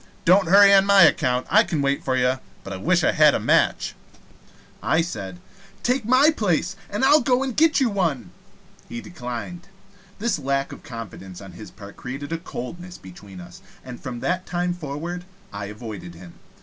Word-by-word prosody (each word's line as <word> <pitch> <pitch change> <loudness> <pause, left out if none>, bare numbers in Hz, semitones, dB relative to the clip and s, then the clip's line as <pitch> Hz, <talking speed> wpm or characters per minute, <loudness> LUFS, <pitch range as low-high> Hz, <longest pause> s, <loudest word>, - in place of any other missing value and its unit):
Don't 185 +2 +5
hurry 200 +1 +7
on 195 0 +6
my 200 -2 +7
account. 130 -5 +2
I 215 +2 +5
can 165 -8 -3
wait 140 0 0
for 130 - 0
you. 130 +1 +1 0.2
But 100 - -7
I - - -5
wish 95 - +1
I - - +3
had - - +5
a - - 0
match." - - +1 0.9
I 160 - +2
said: 95 - -6 0.4
"Take 250 -1 0
my 260 +6 +5
place, 195 - -1
and 205 +6 0
I'll 295 +3 +6
go 255 -1 +1
and 260 -4 -4
get 320 -1 +4
you 265 - +3
one." 170 - -2 0.6
He 120 - -6
declined. 160 +4 -7 0.5
This 215 -5 -1
lack 140 0 -1
of - - -10
confidence 105 -8 -9
on 95 -2 -11
his 100 +5 -11
part 100 -2 -13
created 135 +4 -7
a 165 - -3
coldness 175 +3 -8
between 95 +1 -13
us, 90 0 -12 0.2
and 125 -2 -9
from 120 -2 -6
that 180 +1 -2
time 175 0 -1
forward 170 +2 -6 0.3
I 100 0 -5
avoided 105 -4 -8
him. 85 0 -13
150 Hz, 185 wpm, -23 LUFS, 115-195 Hz, 0.9 s, hurry